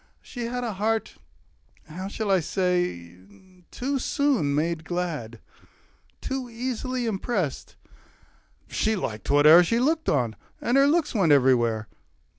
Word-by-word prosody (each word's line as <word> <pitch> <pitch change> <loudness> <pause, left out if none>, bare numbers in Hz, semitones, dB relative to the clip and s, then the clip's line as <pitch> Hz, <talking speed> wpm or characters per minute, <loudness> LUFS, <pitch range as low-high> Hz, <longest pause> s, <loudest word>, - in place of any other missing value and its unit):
She 245 -3 -6
had 245 +1 -3
A 230 -3 -3
heart 220 +2 -2 0.7
how 185 +5 -6
shall 205 0 -3
I 190 - +4
say 175 - -2 0.5
too 275 +2 -2
soon 255 - +1
made 160 +2 -1
glad, 160 -10 -4 0.8
Too 265 -2 -4
easily 250 +1 -3
impressed; 195 - -3 0.9
she 220 0 0
liked 110 - -5
whate'er 150 +4 +7
She 230 +7 0
looked 315 +5 +1
on, 120 -6 0 0.2
and 240 - 0
her 275 +1 +5
looks 315 +1 +1
went 190 -9 +2
everywhere. 120 -5 +3
190 Hz, 125 wpm, -25 LUFS, 145-245 Hz, 0.9 s, whate'er